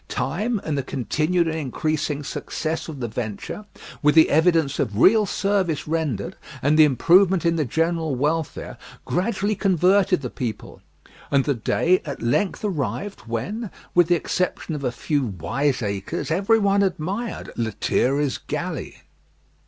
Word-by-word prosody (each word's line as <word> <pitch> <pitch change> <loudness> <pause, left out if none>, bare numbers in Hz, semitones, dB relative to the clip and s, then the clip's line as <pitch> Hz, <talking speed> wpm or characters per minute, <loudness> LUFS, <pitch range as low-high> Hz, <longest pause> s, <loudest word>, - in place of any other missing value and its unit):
Time 210 - -1
and 155 - -2
the - - +1
continued 155 +7 0
and 160 0 -2
increasing 150 +1 -2
success 160 +3 -4
of 150 -5 -7
the 120 - -1
venture, 110 - -5 0.4
with 150 +1 +4
the 160 - +6
evidence 160 -3 +3
of 105 -1 -1
real 210 - +5
service 190 -8 0
rendered 160 - -2 0.3
and 145 +3 +3
the 155 - +8
improvement 175 - +4
in 170 0 +3
the 155 -3 0
general 165 +1 0
welfare, 150 +4 -2 0.3
gradually 200 +2 0
converted 190 -3 +3
the 125 - -3
people; 120 -4 -5 0.5
and 140 -2 +2
the 145 - +2
day 165 +9 +1
at 140 -3 -6
length 145 - 0
arrived 195 +3 -3
when, 195 - -3 0.2
with 175 -2 +5
the 175 - +4
exception 180 0 -2
of 145 -2 -4
a 125 - 0
few 145 +4 -1
wiseacres, 105 - -2
every 200 +7 +3
one 200 -1 +2
admired 195 +5 -2
"Lethierry's 125 +5 0
Galley." - - -5
160 Hz, 145 wpm, -23 LUFS, 135-185 Hz, 0.5 s, the